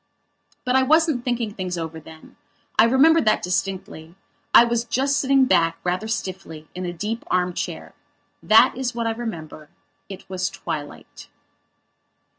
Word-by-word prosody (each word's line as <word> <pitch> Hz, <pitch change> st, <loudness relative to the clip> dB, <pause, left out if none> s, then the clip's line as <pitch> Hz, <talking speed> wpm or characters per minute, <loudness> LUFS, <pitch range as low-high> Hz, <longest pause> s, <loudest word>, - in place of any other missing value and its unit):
But 250 Hz, 0 st, +1 dB
I 265 Hz, -, +5 dB
wasn't 310 Hz, -1 st, +2 dB
thinking 240 Hz, -4 st, -2 dB
things 185 Hz, -3 st, -4 dB
over 160 Hz, -1 st, -5 dB
then. 160 Hz, 0 st, -15 dB, 0.4 s
I 220 Hz, -, +6 dB
remember 295 Hz, +7 st, +5 dB
that 215 Hz, -1 st, +1 dB
distinctly. 180 Hz, -3 st, -4 dB, 0.4 s
I -, -, +8 dB
was 235 Hz, -1 st, 0 dB
just 270 Hz, +4 st, 0 dB
sitting 270 Hz, -1 st, +3 dB
back, 165 Hz, -8 st, +2 dB
rather 180 Hz, +4 st, -2 dB
stiffly, 185 Hz, -7 st, -5 dB
in 180 Hz, 0 st, -5 dB
a -, -, -3 dB
deep 210 Hz, +7 st, -4 dB
arm 180 Hz, 0 st, 0 dB
chair. -, -, -6 dB, 0.5 s
That 215 Hz, +1 st, +5 dB
is 250 Hz, -2 st, -3 dB
what 235 Hz, -1 st, -2 dB
I 225 Hz, -, +1 dB
remember. 165 Hz, -10 st, -7 dB, 0.4 s
It 195 Hz, -1 st, -10 dB
was 185 Hz, 0 st, -2 dB
twilight. 155 Hz, -6 st, -8 dB
205 Hz, 150 wpm, -22 LUFS, 175-240 Hz, 0.5 s, I